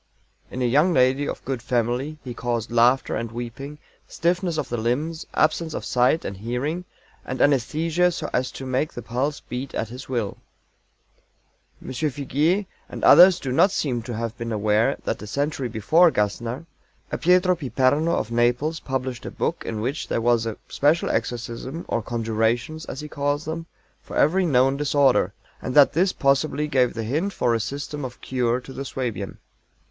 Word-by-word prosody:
"'In 130 - -3
a - - +2
young 150 +9 +3
lady 130 +2 +3
of - - -6
good 130 -3 -3
family' 125 +5 -1
he 125 - -6
caused 120 -1 -3
laughter 120 +3 +3
and 115 0 -3
weeping, 120 +5 -7 0.3
stiffness 175 0 0
of - - -2
the 120 - -3
limbs, 145 +9 -2
absence 160 0 +1
of - - -4
sight 125 +6 +2
and 100 - -5
hearing, 130 - -3 0.4
and 130 - -5
anæsthesia 160 +6 +2
so - - -4
as 125 0 +1
to 135 - -7
make 130 +4 -1
the 120 - -7
pulse 130 +6 -2
beat 130 +2 -6
at 110 - -2
his 130 +3 -9
will." 115 -6 -2 1.5
M. - - -6
FIGUIER 150 +7 0 0.2
and - - -8
others 180 0 +8
do 130 - -4
not 160 +10 +5
seem 130 -10 -1
to 120 0 -6
have 115 +1 -3
been 115 0 -4
aware 110 +4 +2
that - - -3
a 105 - -7
century 140 +2 -2
before 140 - +4
GASSNER, 115 +5 -2 0.5
a - - -1
PIETRO 180 +1 +4
PIPERNO 145 +1 +1
of 115 - -1
Naples 125 +7 +1
published 130 -2 -4
a - - -3
book - - -2
in 110 -2 -3
which 135 +7 -3
there - - 0
was 115 -1 +2
a 110 - -4
special 150 +4 +2
exorcism 120 +6 -3
or 115 - -1
conjurations, 115 +6 -1
as 135 - -6
he 150 - -6
calls 145 +1 -2
them, 165 +1 -5 0.3
for - - -10
every 180 +5 +3
known 135 -1 +3
disorder, 140 -9 +3 0.3
and 125 - -4
that 145 -2 +7
this 185 +4 +3
possibly 145 +1 +1
gave 130 -4 +2
the 115 - -3
hint 155 - -1
for 120 - +1
a 115 - +1
system 140 +4 -4
of 125 -1 -7
cure 125 -1 0
to 130 +1 -11
the 135 - -5
Suabian. 115 -8 -4
130 Hz, 180 wpm, -24 LUFS, 120-150 Hz, 1.5 s, others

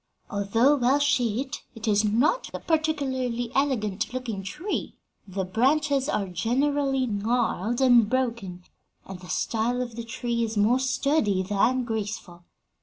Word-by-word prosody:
Although 225 +8 +3
well 255 +2 +3
shaped, 265 -3 0
it 225 +1 -6
is 210 0 +3
not 240 - +1
a - - -4
particularly 260 -7 -1
elegant 230 -9 0
looking 235 -6 -3
tree. 300 - -4 0.3
The 190 0 -3
branches 275 +7 +1
are 200 -2 -1
generally 270 - 0
gnarled 230 +1 -1
and 240 -5 +5
broken, 230 -8 -2 0.4
and 190 -2 -8
the 180 - -12
style 235 +2 0
of 245 -2 -4
the 235 - -5
tree 235 +1 -3
is 225 -1 -3
more 225 +5 +3
sturdy 260 -7 +1
than 210 +6 +1
graceful. 210 -6 -5
235 Hz, 135 wpm, -26 LUFS, 210-265 Hz, 0.4 s, and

